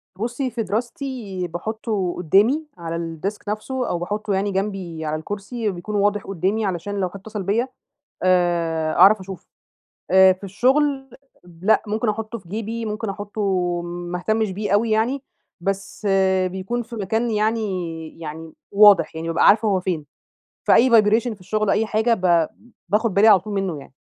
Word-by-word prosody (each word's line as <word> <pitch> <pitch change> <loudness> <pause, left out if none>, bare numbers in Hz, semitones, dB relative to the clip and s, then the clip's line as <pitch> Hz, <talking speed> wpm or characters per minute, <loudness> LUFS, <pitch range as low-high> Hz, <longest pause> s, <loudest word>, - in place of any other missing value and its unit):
بُصي، 240 +5 -3
في 230 -2 -2
دراستي 225 -3 -4
باحطه 200 +1 -3
قدّامي 210 - +3
على 165 -1 -5 0.3
الdesk 205 +2 -2
نفسه، 245 +5 -3
أو 175 - -1
باحطه 205 +3 -3
يعني 195 +1 0
جنبي 190 -5 -3
على 155 0 -1
الكرسي 205 +6 -4
بيكون 185 +4 -6
واضح 205 0 +1
قدّامي، 195 +4 -1
علشان 190 +2 -3
لو 185 -2 0
حد 200 - -10
اتصل 210 0 -6
بيّا 225 +7 0 0.6
آآ 170 -3 +1
أعرف 210 +2 +6
أشوفه. 190 -2 -9 0.7
آآ 190 0 +7
في 185 +2 -18
الشغل 270 +7 +1 0.3
ب 175 0 -17
لأ، 220 - +5
ممكن 215 +2 0
أحطه 220 +2 -3
في 175 -4 -19
جيبي، 225 +2 -4
ممكن 215 0 -3
أحطه 205 +2 -5 0.4
ما 175 0 -5
اهتمش 215 +2 0
بيه 205 +1 -3
أوي 225 +3 +3
يعني، 245 +6 +1 0.4
بس 195 +2 -3 0.4
بيكون 190 +6 -3
في 230 +1 -10
مكان 225 +3 -1
يعني 190 -8 -2
يعني 160 0 -8 0.2
واضح 200 -6 +6
يعني، 165 +1 -4
بابقى 165 0 +3
عارفة 215 +1 +5
هو 195 -3 +2
فين. 170 -5 -3 0.6
فأي 255 +1 +5
vibration 225 +1 +4
في 200 - -21
الشغل 215 +3 -1
أي 225 - +2
حاجة، 220 +2 +2
ب 175 -5 +2 0.4
باخد 210 +1 +1
بالي 210 +3 +6
على 195 -4 +7
طول 210 +2 -7
منه 195 -6 -2
يعني. 135 - -13
205 Hz, 165 wpm, -22 LUFS, 180-220 Hz, 0.7 s, آآ